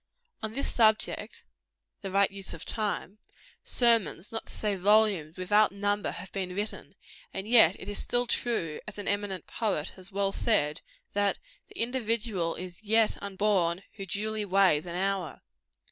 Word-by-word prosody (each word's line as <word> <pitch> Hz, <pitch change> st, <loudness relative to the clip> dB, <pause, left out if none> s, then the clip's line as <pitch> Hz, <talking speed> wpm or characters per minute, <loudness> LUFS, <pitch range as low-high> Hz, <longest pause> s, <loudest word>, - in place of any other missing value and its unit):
On 220 Hz, 0 st, -4 dB
this 275 Hz, +3 st, -1 dB
subject 220 Hz, -2 st, +1 dB, 0.6 s
the 195 Hz, -, -4 dB
right 195 Hz, +1 st, +3 dB
use 195 Hz, -1 st, -4 dB
of -, -, -9 dB
time 210 Hz, -2 st, -3 dB, 0.4 s
sermons, 230 Hz, -7 st, +2 dB
not 225 Hz, -, -5 dB
to -, -, -12 dB
say 210 Hz, -2 st, -2 dB
volumes, 195 Hz, -5 st, +3 dB
without 205 Hz, +4 st, +3 dB
number, 205 Hz, +1 st, -1 dB
have 185 Hz, +2 st, -7 dB
been 185 Hz, -2 st, -4 dB
written; 205 Hz, +2 st, -4 dB, 0.4 s
and 195 Hz, +2 st, -4 dB
yet 220 Hz, -6 st, +6 dB
it -, -, -9 dB
is 205 Hz, -, -1 dB
still 245 Hz, 0 st, +1 dB
true, 200 Hz, -11 st, -1 dB
as 210 Hz, -, -5 dB
an 205 Hz, -, -5 dB
eminent 200 Hz, -3 st, -2 dB
poet 200 Hz, -10 st, -1 dB
has 185 Hz, 0 st, -9 dB
well 195 Hz, 0 st, 0 dB
said, 160 Hz, -10 st, +1 dB, 0.3 s
that 205 Hz, 0 st, +1 dB, 0.3 s
the -, -, -14 dB
individual 230 Hz, -7 st, 0 dB
"is 180 Hz, +1 st, -7 dB
yet 220 Hz, +1 st, +2 dB
unborn 195 Hz, -3 st, 0 dB
who 195 Hz, -1 st, -6 dB
duly 215 Hz, +3 st, -1 dB
weighs 185 Hz, -5 st, +3 dB
an 170 Hz, -, -5 dB
hour." 190 Hz, -2 st, -2 dB
200 Hz, 160 wpm, -29 LUFS, 185-215 Hz, 0.6 s, yet